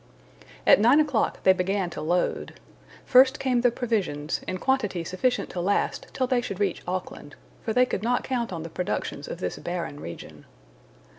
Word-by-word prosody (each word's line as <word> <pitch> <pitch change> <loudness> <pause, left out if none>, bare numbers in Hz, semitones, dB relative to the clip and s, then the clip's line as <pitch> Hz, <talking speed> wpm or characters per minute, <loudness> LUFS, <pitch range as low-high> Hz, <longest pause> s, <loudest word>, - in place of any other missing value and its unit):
At - - +7
nine 240 +8 +6
o'clock 290 -7 0
they 190 - +7
began 185 0 -1
to - - -6
load. 175 +3 -1 0.5
First 260 +3 +6
came 255 -3 +1
the 245 - +5
provisions, 200 - -2
in 185 - -2
quantity 210 -7 0
sufficient 185 +9 -1
to 175 - -3
last 200 +3 0
till 260 - 0
they 250 -1 +1
should 200 -5 -5
reach 200 -4 0
Auckland, 180 -5 -5 0.3
for 225 - -3
they 250 +3 +4
could 220 - -3
not 245 +3 0
count 240 -4 -2
on 165 -3 -5
the 165 - -7
productions 180 - -3
of - - -5
this - - -4
barren 175 -4 -4
region. 85 - -9
205 Hz, 175 wpm, -26 LUFS, 180-250 Hz, 0.5 s, At